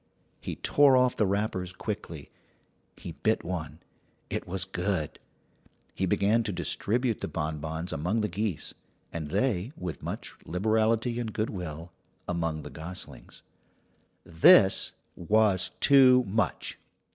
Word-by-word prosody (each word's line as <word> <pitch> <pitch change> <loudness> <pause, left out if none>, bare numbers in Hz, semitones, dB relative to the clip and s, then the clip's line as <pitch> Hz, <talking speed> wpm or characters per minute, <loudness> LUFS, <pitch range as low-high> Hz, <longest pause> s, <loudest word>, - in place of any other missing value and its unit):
He - - -5
tore 140 -2 +4
off 125 -1 +3
the 105 - +2
wrappers 100 -2 -1
quickly. - - -6 0.7
He - - -7
bit - - 0
one. 80 -3 -5 0.5
It - - -3
was 95 0 -1
good. 90 -4 -2 0.7
He 95 - -1
began 105 +4 +2
to 105 -2 -3
distribute 115 +5 -1
the - - -2
bonbons 80 +1 -4
among 90 +9 0
the 105 - 0
geese, 100 -2 -3 0.4
and 80 -3 -4
they, 105 - 0
with 90 -5 -5
much - - -6
liberality 110 +5 +1
and 115 -2 -3
good 110 +1 -2
will, 85 -3 -6 0.4
among 85 -3 -2
the - - -9
goslings. 80 +6 -9 0.8
This 85 +3 +5 0.2
was 100 +1 +2
too 130 -2 +7
much. 100 -4 -2
95 Hz, 125 wpm, -28 LUFS, 85-110 Hz, 0.8 s, too